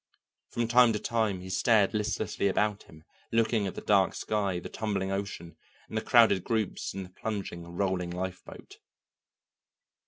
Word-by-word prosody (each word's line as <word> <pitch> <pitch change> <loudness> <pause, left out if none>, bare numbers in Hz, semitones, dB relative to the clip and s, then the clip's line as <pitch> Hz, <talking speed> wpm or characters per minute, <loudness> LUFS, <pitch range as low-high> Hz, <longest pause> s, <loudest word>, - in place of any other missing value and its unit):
From 120 -1 -1
time 120 0 +6
to 105 - -1
time 110 -6 -1
he 95 - -8
stared 105 +2 +3
listlessly 105 -2 -1
about 105 +1 +1
him, 80 0 -16 0.3
looking 115 -2 +2
at 95 - -6
the - - -6
dark 100 -2 +3
sky, 100 -4 -1
the - - -7
tumbling 100 -3 -2
ocean, 95 -4 -5 0.3
and - - -9
the - - +1
crowded 95 -3 +5
groups 110 -5 -2
in 95 - -4
the 90 - -11
plunging, 95 -4 -5
rolling 95 -2 -1
lifeboat. 90 +1 -7
100 Hz, 155 wpm, -29 LUFS, 95-110 Hz, 0.3 s, time